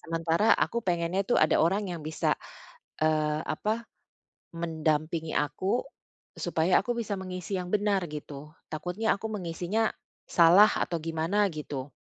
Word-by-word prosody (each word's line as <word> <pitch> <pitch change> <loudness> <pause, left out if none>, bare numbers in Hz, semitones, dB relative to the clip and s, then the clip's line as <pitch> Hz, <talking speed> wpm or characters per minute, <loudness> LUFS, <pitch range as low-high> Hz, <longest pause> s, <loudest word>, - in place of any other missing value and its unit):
sementara 165 +5 +2
aku 235 - 0
pengennya 175 +1 0
tuh - - +3
ada 155 - +4
orang 195 +6 +2
yang 170 - -5
bisa, 155 - 0 0.7
eee, 155 -1 +2
apa, 225 +2 -2 0.7
mendampingi 160 0 -1
aku 185 - 0 0.5
supaya 175 +1 +2
aku 245 - -2
bisa 210 -3 -2
mengisi 185 +1 -4
yang 180 - -6
benar, 205 -1 +2
gitu. 150 0 -8 0.2
Takutnya 180 +8 -1
aku 220 - -5
mengisinya 180 +4 -1 0.4
salah 180 +5 +7
atau 170 - -2
gimana, 165 +6 +1
gitu. 145 -3 -6
170 Hz, 130 wpm, -28 LUFS, 155-200 Hz, 0.7 s, salah